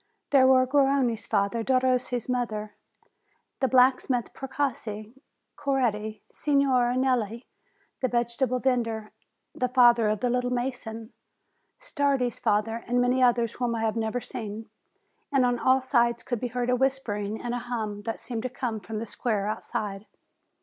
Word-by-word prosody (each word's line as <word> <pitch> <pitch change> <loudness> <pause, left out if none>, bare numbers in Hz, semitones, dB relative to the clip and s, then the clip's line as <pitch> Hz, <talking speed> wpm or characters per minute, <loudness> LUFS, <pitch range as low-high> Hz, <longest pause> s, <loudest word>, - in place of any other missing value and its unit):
There 265 -2 +6
were 260 -1 +5
Garrone's 270 -4 +2
father, 210 +2 0
Derossi's 255 -1 +1
mother, 220 -4 -2 0.9
the 265 - +2
blacksmith 255 -1 +3
Precossi, 235 -6 -4 0.4
Coretti, 225 -6 -1
Signora 265 -4 +2
Nelli, 240 -3 0 0.5
the 255 - 0
vege 235 0 -1
table 255 -1 +1
vendor, 230 -4 -1 0.4
the 250 - -1
father 240 -3 +5
of 215 -1 -1
the 245 - +1
"little 250 0 0
mason," 240 -2 -4 0.7
Stardi's 280 - 0
father, 225 +2 0
and 245 +1 +1
many 250 +1 +2
others 240 -2 +3
whom 245 -2 -2
I 225 - -2
had 220 -1 0
never 225 +2 -1
seen; 220 -2 -7 0.6
and 270 -3 +3
on 245 -1 +1
all 260 +2 +3
sides 235 -2 +1
could 245 -3 -3
be 250 - -2
heard 245 +1 -1
a - - +4
whispering 225 -6 -1
and 240 0 -4
a 245 - -1
hum, 220 -4 -4
that 225 - -3
seemed 235 -3 -5
to 255 - -3
come 240 -3 -3
from 215 +3 -6
the 225 - -3
square 215 -2 -1
outside. 210 -1 -4
245 Hz, 150 wpm, -27 LUFS, 220-255 Hz, 0.9 s, There